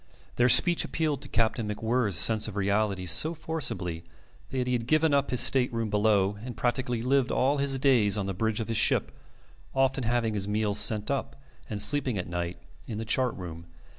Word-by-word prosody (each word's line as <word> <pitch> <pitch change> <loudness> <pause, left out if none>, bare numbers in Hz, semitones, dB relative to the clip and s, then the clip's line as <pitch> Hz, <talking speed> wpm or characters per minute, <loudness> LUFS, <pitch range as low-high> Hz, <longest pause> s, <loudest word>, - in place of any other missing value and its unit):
Their 120 +1 +3
speech 175 +7 +7
appealed 155 -4 -3
to - - -6
Captain 115 -1 -1
MacWhirr's 110 -2 0
sense 110 +3 +2
of 105 - -8
realities 100 -3 -1
so 155 - +4
forcibly 110 - -4 0.5
that 130 -1 -3
he 125 - -2
had 120 -1 -3
given 155 +1 +1
up 140 0 0
his 125 - +3
state 130 -2 +3
room 115 -2 -4
below 105 -1 0
and 120 -3 -9
practically 120 -1 -2
lived 130 0 0
all 140 +3 0
his 140 -1 0
days 120 -7 +2
on 100 - -3
the 95 - -4
bridge 110 +3 -2
of 115 - -5
his 115 -1 -2
ship, - - +1 0.6
often 135 0 0
having 115 -1 -1
his 100 -1 -2
meals 105 -1 0
sent 105 +3 +2
up, 140 - -4 0.3
and 105 - -5
sleeping 130 -1 +2
at 90 - -4
night 85 0 -5 0.3
in 110 - -6
the 110 - -5
chart 125 +1 -1
room. 85 -2 -10
115 Hz, 195 wpm, -26 LUFS, 105-130 Hz, 0.6 s, speech